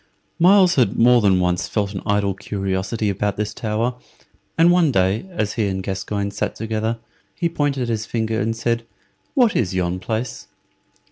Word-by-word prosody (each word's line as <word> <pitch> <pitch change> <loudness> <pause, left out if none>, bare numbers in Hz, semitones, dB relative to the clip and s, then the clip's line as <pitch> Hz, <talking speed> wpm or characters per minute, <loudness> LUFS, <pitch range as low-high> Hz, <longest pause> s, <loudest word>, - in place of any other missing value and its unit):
Myles 185 +1 +6
had 120 -7 +2
more 120 +1 +5
than 95 -3 +3
once 90 0 0
felt 100 -2 -2
an 95 - -5
idle 100 -1 +1
curiosity 95 +2 -3
about 100 +1 -1
this 105 0 -2
tower, 115 +2 -1 0.6
and 165 +2 +6
one 175 -4 +4
day, 95 - +1
as 105 - -2
he 110 -4 0
and 95 -1 -3
Gascoyne 100 +1 -3
sat 100 +1 -3
together, 110 +1 -2 0.4
he 170 - 0
pointed 145 -6 -1
his 110 -1 -2
finger 110 -1 -1
and 115 +2 -1
said, 115 0 -1 0.5
"What 245 -6 +4
is 95 -5 0
yon 90 0 -1
place?" 110 +6 -4
110 Hz, 165 wpm, -21 LUFS, 100-120 Hz, 0.6 s, Myles